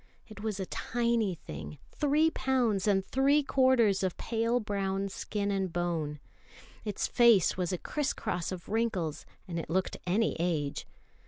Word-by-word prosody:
It 215 -2 -11
was 215 -2 -3
a 190 - -2
tiny 235 -3 0
thing, 75 - -8
three 300 +2 +2
pounds 245 -9 +1
and 195 -2 +3
three 280 +5 +3
quarters 255 -7 +3
of 185 -2 -1
pale 230 +1 0
brown 195 -2 -2
skin 205 +1 -3
and 190 -2 -1
bone. 165 -4 -2 0.6
Its 210 -2 -2
face 235 -7 +5
was 180 -1 -1
a 180 - -1
criss 295 - -2
cross 180 -6 -3
of 185 -2 -7
wrinkles, 205 -8 -1 0.2
and 170 -2 -3
it - - -6
looked 185 +3 0
any 215 +5 +2
age. 155 -5 -1
200 Hz, 155 wpm, -30 LUFS, 180-235 Hz, 0.6 s, face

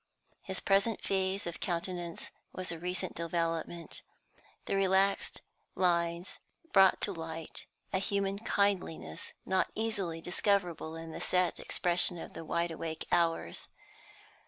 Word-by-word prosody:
His 190 -2 -3
present 200 +3 +3
phase 190 0 0
of 170 -1 -4
countenance 175 -1 -2 0.2
was 185 -1 -2
a 170 - -5
recent 180 +1 -1
development; 165 0 -2 0.6
the - - 0
relaxed 195 0 +2 0.3
lines 170 0 +1 0.3
brought 195 -1 +7
to 200 - +2
light 165 -1 -6 0.3
a 190 - +3
human 200 0 0
kindliness 85 - 0
not 190 0 +2
easily 200 -7 -1
discoverable 175 -2 +1
in 165 0 -7
the - - -6
set 180 -1 +2
expression 175 0 +3
of - - -8
wide 170 +1 -1
awake 160 0 -4
hours. 170 -1 +1
175 Hz, 120 wpm, -32 LUFS, 165-195 Hz, 0.6 s, brought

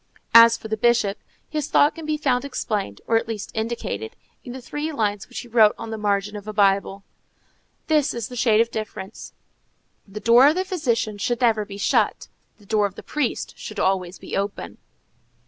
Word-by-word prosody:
As 230 0 +8
for - - -9
the 220 0 -2
Bishop, 215 -3 +2 0.3
his 300 -2 -3
thought 290 - +4
can 325 -2 -9
be 305 0 0
found 255 -4 +1
explained, 210 - -3
or 225 - +3
at 225 - -2
least 220 -3 -5
indicated, 220 - -4 0.3
in 245 - -8
the 260 - -7
three 295 +5 -4
lines 210 -7 -2
which 250 - -6
he 245 - -12
wrote 220 -3 +4
on 230 -1 -7
the - - -3
margin 205 0 -1
of 205 0 -8
a 215 - -5
Bible, 195 -1 +1 0.8
"This 300 -2 +2
is 235 -2 -4
the 250 - -10
shade 225 -2 +3
of 230 0 -1
difference: 215 -2 -7 0.7
the 200 +2 -8
door 235 +4 +6
of 305 - +3
the 370 +1 -1
physician 235 - -1
should 240 +4 -1
never 220 -3 +2
be 200 -1 -9
shut, 200 - 0 0.3
the 205 - -21
door 210 0 +2
of 195 - -14
the - - -10
priest 300 -5 -3
should - - -7
always 185 -1 0
be - - -7
open." 200 +1 -4
225 Hz, 200 wpm, -23 LUFS, 205-250 Hz, 0.8 s, As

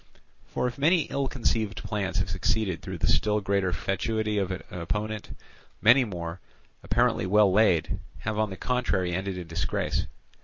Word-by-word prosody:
For - - -2
if 125 +1 -3
many 165 +5 +4
ill 140 -1 0
conceived 115 -5 -1
plans 105 -2 -2
have 95 -2 0
succeeded 95 -1 0
through 95 -1 -6
the 80 - -1
still 105 0 +2
greater 100 -2 0
fatuity 105 +3 -1
of 95 -2 -1
an 90 -1 -4
opponent, 105 +5 -4 0.4
many 125 +4 +6
more, 85 -4 -5 0.4
apparently 95 - +1
well 105 0 +5
laid, 95 -6 +3 0.2
have 110 +4 -2
on 110 -1 +1
the 95 - -7
contrary 120 -8 0
ended 95 +1 -2
in 90 - -5
disgrace. 80 0 -1
100 Hz, 160 wpm, -27 LUFS, 90-110 Hz, 0.4 s, many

